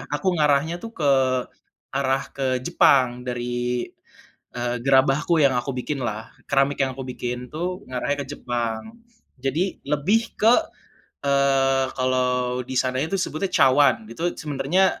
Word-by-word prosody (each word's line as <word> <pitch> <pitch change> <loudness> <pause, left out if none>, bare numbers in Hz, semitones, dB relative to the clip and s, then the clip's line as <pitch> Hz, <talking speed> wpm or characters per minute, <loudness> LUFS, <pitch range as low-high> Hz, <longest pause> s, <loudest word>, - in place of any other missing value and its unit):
aku 165 +6 0
ngarahnya 150 +4 +2
tuh 225 +3 -8
ke 145 -3 +2 0.9
arah 135 0 0
ke 130 -2 0
Jepang 125 -1 +3
dari, 120 0 -2 0.7
eee, 120 0 -2
gerabahku 135 +5 +3
yang 140 - +5
aku 130 +2 -4
bikin 135 +3 -3
lah, 115 -2 -4 0.2
keramik 135 0 +1
yang 130 -2 0
aku 135 - -6
bikin 125 -1 -5
tuh 180 +4 -4
ngarahnya 140 +3 -2
ke - - -13
Jepang. 120 - -3 0.5
Jadi 160 +8 -1
lebih 165 +11 +1
ke, 235 +9 +5 0.6
eee, 135 -1 +3
kalau 125 -1 0
di 130 - -4
sana 130 0 +1
itu 160 +7 -1
sebutnya 185 0 -2
cawan, 135 -6 +4
itu 170 +8 -2
sebenernya 150 +6 +1
135 Hz, 135 wpm, -23 LUFS, 125-150 Hz, 0.9 s, yang